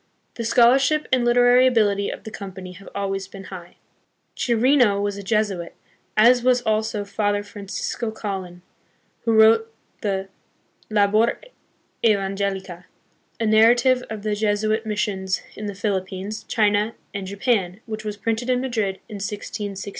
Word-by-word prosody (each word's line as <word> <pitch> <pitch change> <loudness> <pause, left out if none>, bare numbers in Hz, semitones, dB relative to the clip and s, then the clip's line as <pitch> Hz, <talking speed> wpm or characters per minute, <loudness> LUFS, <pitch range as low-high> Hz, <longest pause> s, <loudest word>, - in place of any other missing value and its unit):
The 230 - -5
scholarship 265 +6 +4
and 255 -1 +3
liter 240 +1 +4
ary 250 +1 +6
ability 205 -5 +2
of - - -7
the 220 - -8
Company 190 -3 -8
have 190 +2 -12
always 195 -1 -2
been 195 0 -10
high. 175 -2 -10 0.6
Chi 240 - 0
rino 240 -3 +4
was 205 0 -1
a 200 - -6
Jesuit, 200 -4 -1 0.4
as 240 +3 +6
was 250 0 +3
also 215 -1 0
Father 205 0 -1
Francisco 205 +2 -4
Colin, 190 -5 -6 0.6
who 230 - +2
wrote 225 +1 +5 0.3
the 195 -2 -2 0.6
Labor 215 +2 +2 0.6
Evangelica, 195 -4 -1 0.5
a 225 - 0
narrative 240 +4 +4
of 215 -2 -6
the 215 -1 0
Jesuit 215 +1 0
mis 210 -1 -2
sions 190 -2 -2
hi - - -9
the 200 - -5
Philippines, 195 +1 -3
China, 210 0 +1 0.2
and 200 -2 -5
Japan, 195 -2 0
which 220 -1 -6
was 210 -1 -5
printed 225 +3 -2
hi 255 - +4
Madrid 230 -6 -1
hi - - -11
1663. 200 0 -5
210 Hz, 145 wpm, -23 LUFS, 195-225 Hz, 0.6 s, ary